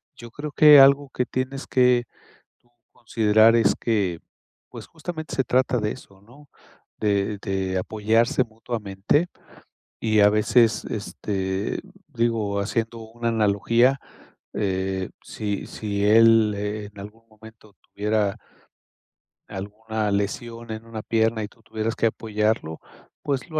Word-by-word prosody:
yo 120 - -11
creo 145 +5 -7
que 150 -1 +8
algo 140 +1 +6
que 125 - -1
tienes 130 +2 -4
tú 125 -2 +1 0.7
considerar 110 0 +3
es 115 - +3
que, 100 -7 0 0.5
pues - - -10
justamente 160 -2 -7
se 130 - +1
trata 130 0 +1
de 105 -1 -1
eso, 100 -6 -12
¿no?, 140 +6 -18 0.5
de 100 0 0
de 95 -2 -2
apoyarse 110 +6 +1
mutuamente, 110 - -2 0.7
y 110 -2 +2
a 105 - +7
veces, 110 +1 +2
este, 95 -2 -3 0.3
digo, 110 -4 -1
haciendo 115 +3 -2
una 115 +1 -5
analogía, 115 +4 +2 0.5
eh, 95 -1 -2
si 105 -2 -4
si 100 -2 -3
él 115 0 +5
en 105 0 -5
algún 110 +3 -12
momento 110 -1 -17
tuviera 105 -1 -1 1.1
alguna 105 +2 -4
lesión 115 +3 -3
en 110 +1 -7
una 115 -1 -7
pierna 110 0 0
y 105 - -4
tú 115 - -25
tuvieras 110 +1 -3
que 115 - +2
apoyarlo, 110 -6 -2 0.4
pues 140 +3 -2
lo 155 -1 -2
110 Hz, 125 wpm, -23 LUFS, 105-120 Hz, 1.1 s, que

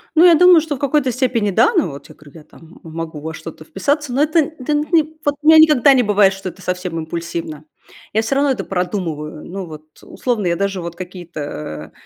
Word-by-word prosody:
Ну, 330 +2 +6
я 345 -2 +7
думаю, 360 +1 +7
что 310 -2 -4
в - - -11
какой-то 280 -2 +1
степени- 240 -5 0
да, 455 - +3
но 345 - +1
вот 140 0 -11
я - - -14
говорю, 150 -2 -17
я - - -16
там 165 +2 -18
могу 160 -1 -7
во 160 +1 -6
что-то 155 0 -10
вписаться, 280 - -2
но 260 +3 0
это 310 +2 +3
это 300 -2 -2
ни 310 +2 +2 0.2
вот 290 0 +1
у 300 - -4
меня 320 0 +8
никогда 300 -4 +6
не 255 -2 +3
бывает, 205 -2 +3
что 195 -1 -6
это 190 - -15
совсем 180 -2 -4
импульсивно. 160 -1 -5 0.5
Я 220 - +2
всё 225 +5 -2
равно 280 0 +2
это 230 -7 -2
продумываю. 175 -5 -4
Ну, 190 +1 -6
вот, 155 -2 -11 0.2
условно, 230 -7 -2
я 170 - +1
даже 195 0 -2
вот 170 0 -7
какие-то, 175 -2 -9
э, 75 - -7
195 Hz, 225 wpm, -18 LUFS, -, 0.5 s, меня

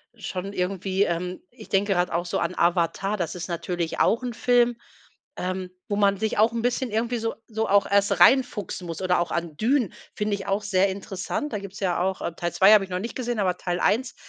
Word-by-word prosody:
schon 195 -3 -5
irgendwie, 190 +1 0
ähm 180 +1 -2
ich 235 -3 -14
denke 195 +1 +2
gerade 175 -1 0
auch 170 +1 0
so - - -1
an - - -1
Avatar, 175 +3 +1
das 175 -3 -2
ist 175 - -5
natürlich 170 -1 -3
auch 230 - +3
'n 245 -1 -3
Film, 240 0 +2 0.6
ähm, 185 0 -3 0.2
wo 205 - 0
man 200 -1 +3
sich 220 +1 -2
auch 220 +2 +4
'n 230 - -1
bisschen 245 0 -1
irgendwie 235 +3 0
so 225 0 -2
so 220 -1 -2
auch 200 0 +4
erst 200 0 +2
reinfuchsen 240 -8 +3
muss 165 +1 -5
oder 180 -1 +2
auch 175 - -3 0.3
Dune 240 - +1 0.2
finde 210 -1 -1
ich 195 0 -8
auch 200 +1 0
sehr 195 -1 +2
interessant. 195 +7 -4
Da 210 - -1
gibt’s 200 0 -9
ja 180 -3 0
auch 190 +1 -1
äh, 170 - -3
Teil 175 0 -2
2. 195 +3 +7
habe 210 -2 +6
ich - - -19
noch 180 - -1
nicht 230 +5 -5
gesehen, 240 -3 -2
aber 185 -3 +1
Teil 175 -1 -2
1. 240 +7 +1
200 Hz, 225 wpm, -25 LUFS, 180-220 Hz, 0.6 s, 2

